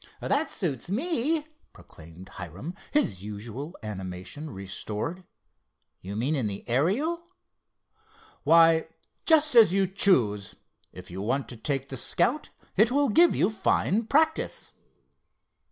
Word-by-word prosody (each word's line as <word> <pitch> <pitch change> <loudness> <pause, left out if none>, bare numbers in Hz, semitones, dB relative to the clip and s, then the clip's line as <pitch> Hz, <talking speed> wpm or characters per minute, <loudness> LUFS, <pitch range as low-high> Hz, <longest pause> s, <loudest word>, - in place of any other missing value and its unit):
"That 295 +3 0
suits 160 - -3
me," 300 - 0 0.3
proclaimed 85 +4 -14
Hiram, 100 - -8 0.2
his 100 - 0
usual 110 - -7
animation 95 +8 -6
restored—"you 100 - -8
mean 130 +8 0
in 130 -6 -1
the 100 +1 -6
Ariel?" 250 - 0 1.1
"Why, 165 0 +5 0.4
just 310 -3 +5
as 225 -7 +7
you 195 -1 +3
choose. 125 - +2 0.4
If 90 -1 -12
you 95 +2 -6
want 130 +6 -1
to 120 - -6
take 135 +3 -3
the 135 - -5
Scout, 235 - +1 0.3
it 215 +4 +4
will 280 +1 +2
give 340 +10 +5
you 200 - +2
fine 215 +1 0
practice." 315 +5 +1
150 Hz, 120 wpm, -27 LUFS, -, 1.1 s, as